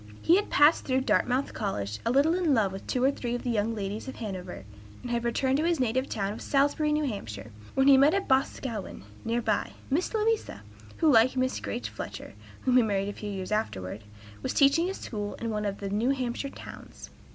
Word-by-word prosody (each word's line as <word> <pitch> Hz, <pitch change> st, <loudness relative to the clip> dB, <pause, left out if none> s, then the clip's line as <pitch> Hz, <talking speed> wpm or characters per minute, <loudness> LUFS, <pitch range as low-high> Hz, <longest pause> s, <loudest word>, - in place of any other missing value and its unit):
He 340 Hz, -, +6 dB
had 410 Hz, -, -1 dB
passed 295 Hz, +3 st, +5 dB
through 260 Hz, 0 st, +1 dB
Dartmouth 245 Hz, +4 st, +1 dB
College 105 Hz, -, -3 dB
a -, -, +3 dB
little 280 Hz, +6 st, +4 dB
in 345 Hz, -6 st, +2 dB
love 205 Hz, -5 st, +2 dB
with 195 Hz, -, -8 dB
two 250 Hz, -, 0 dB
or 270 Hz, -, +5 dB
three 240 Hz, -3 st, -3 dB
of 245 Hz, -, -5 dB
the 245 Hz, -, -1 dB
young 225 Hz, +1 st, 0 dB
ladies 205 Hz, +3 st, -4 dB
of 265 Hz, -, -6 dB
Hanover, 185 Hz, -, -6 dB, 0.4 s
and 245 Hz, -, -5 dB
had 235 Hz, 0 st, 0 dB
returned 260 Hz, +3 st, +1 dB
to 305 Hz, -, 0 dB
his 335 Hz, -2 st, +1 dB
native 255 Hz, +2 st, 0 dB
town 200 Hz, -1 st, -2 dB
of 220 Hz, -, -9 dB
Salisbury, 285 Hz, +2 st, +2 dB
N. 300 Hz, 0 st, +1 dB
H., 200 Hz, -, -4 dB, 0.4 s
when 270 Hz, 0 st, +3 dB
he 275 Hz, -1 st, +8 dB
met 290 Hz, +6 st, +5 dB
in 395 Hz, -, +1 dB
Boscawen, 260 Hz, -, -1 dB, 0.2 s
near 230 Hz, +1 st, -1 dB
by, 215 Hz, -2 st, 0 dB, 0.2 s
Miss 325 Hz, +7 st, +1 dB
Louisa, 445 Hz, 0 st, -1 dB, 0.3 s
who, 320 Hz, -3 st, +4 dB
like 245 Hz, +2 st, +5 dB
Miss 255 Hz, 0 st, 0 dB
Grace 240 Hz, -, -4 dB
Fletcher, -, -, -7 dB, 0.3 s
whom 255 Hz, -1 st, +3 dB
he -, -, +7 dB
married 200 Hz, -3 st, 0 dB
a -, -, -5 dB
few 210 Hz, -, -6 dB
years 190 Hz, -1 st, -5 dB
afterward, 105 Hz, -, -2 dB, 0.4 s
was -, -, -3 dB
teaching 315 Hz, +6 st, +4 dB
school 205 Hz, -2 st, -5 dB
in 230 Hz, -1 st, -4 dB
one 210 Hz, -1 st, -2 dB
of 200 Hz, -1 st, -2 dB
the 200 Hz, -, -5 dB
New 220 Hz, +5 st, +1 dB
Hampshire 265 Hz, 0 st, -2 dB
towns. -, -, -11 dB
245 Hz, 215 wpm, -28 LUFS, 205-275 Hz, 0.4 s, he